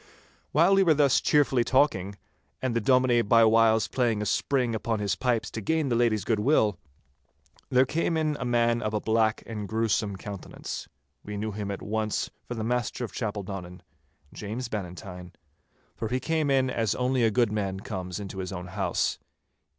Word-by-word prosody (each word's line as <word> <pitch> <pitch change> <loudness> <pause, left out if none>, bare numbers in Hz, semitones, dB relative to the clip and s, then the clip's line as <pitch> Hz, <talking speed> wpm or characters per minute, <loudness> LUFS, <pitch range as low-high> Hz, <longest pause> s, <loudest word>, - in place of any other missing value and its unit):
While 170 +6 +4
we 195 - +5
were 165 -5 +4
thus 140 -2 +4
cheerfully 135 -4 +3
talking, 100 -8 +1 0.4
and 130 -3 -2
the 115 - +1
Dominie 125 -1 +4
by 115 +1 +5
whiles 110 0 +4
playing 120 -4 0
a 105 - -2
spring 125 +1 0
upon 110 0 -1
his 105 -2 -1
pipes 125 -3 -1
to 110 - -5
gain 155 +5 0
the 120 - +1
lady's 115 -3 +2
goodwill, 110 - +2 0.9
there 130 +1 +4
came 165 +3 0
in 155 -1 0
a - - -3
man 120 -1 +2
of 110 0 -2
a - - +1
black 110 0 +1
and 105 -3 -5
gruesome 110 -2 0
countenance. 100 -1 -7 0.4
We 105 0 -6
knew 110 +1 -3
him 105 0 -5
at 100 - -5
once 110 0 -2 0.2
for 120 - -4
the 110 - -3
master 120 +1 -1
of - - -11
Chapeldonnan, 100 -5 -5 0.5
James 115 +4 -5
Bannatyne, 90 -3 -7 0.6
for 110 - -3
he 125 +4 -1
came 155 +1 0
in 130 -1 +2
as 115 -4 0
only 125 0 +1
a 115 - +4
goodman 105 -4 0
comes 90 -3 -5
into 95 -1 -7
his 90 -1 -4
own 90 -1 -6
house. - - -1
115 Hz, 175 wpm, -27 LUFS, 105-125 Hz, 0.9 s, we